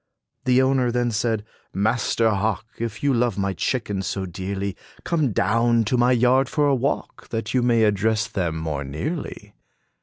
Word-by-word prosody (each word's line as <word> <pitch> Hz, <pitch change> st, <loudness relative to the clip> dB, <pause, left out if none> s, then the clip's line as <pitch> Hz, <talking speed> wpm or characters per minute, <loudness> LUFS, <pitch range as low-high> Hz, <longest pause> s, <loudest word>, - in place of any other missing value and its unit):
The 130 Hz, 0 st, +4 dB
owner 130 Hz, -2 st, +2 dB
then 120 Hz, 0 st, 0 dB
said, 110 Hz, -1 st, -1 dB, 0.3 s
"Master 110 Hz, +2 st, +1 dB
Hawk, 105 Hz, +1 st, -1 dB
If 115 Hz, -1 st, -4 dB
you 140 Hz, -1 st, +3 dB
love 120 Hz, -4 st, +1 dB
my 100 Hz, -1 st, 0 dB
chickens 100 Hz, -5 st, -2 dB
so 95 Hz, -1 st, -2 dB
dearly, 95 Hz, +2 st, -4 dB, 0.3 s
Come 155 Hz, -7 st, +1 dB
down 115 Hz, +3 st, +2 dB
to 110 Hz, +4 st, 0 dB
my 120 Hz, +1 st, +3 dB
yard 125 Hz, +2 st, +3 dB
for 150 Hz, -2 st, +1 dB
a 140 Hz, -, +3 dB
walk, 135 Hz, +3 st, -2 dB
That 115 Hz, -1 st, -3 dB
you 130 Hz, -, +3 dB
may 120 Hz, -2 st, +3 dB
address 105 Hz, +1 st, +2 dB
them 85 Hz, -5 st, -2 dB
more 80 Hz, -3 st, -3 dB
nearly." 100 Hz, -, -5 dB
115 Hz, 170 wpm, -23 LUFS, 100-125 Hz, 0.3 s, The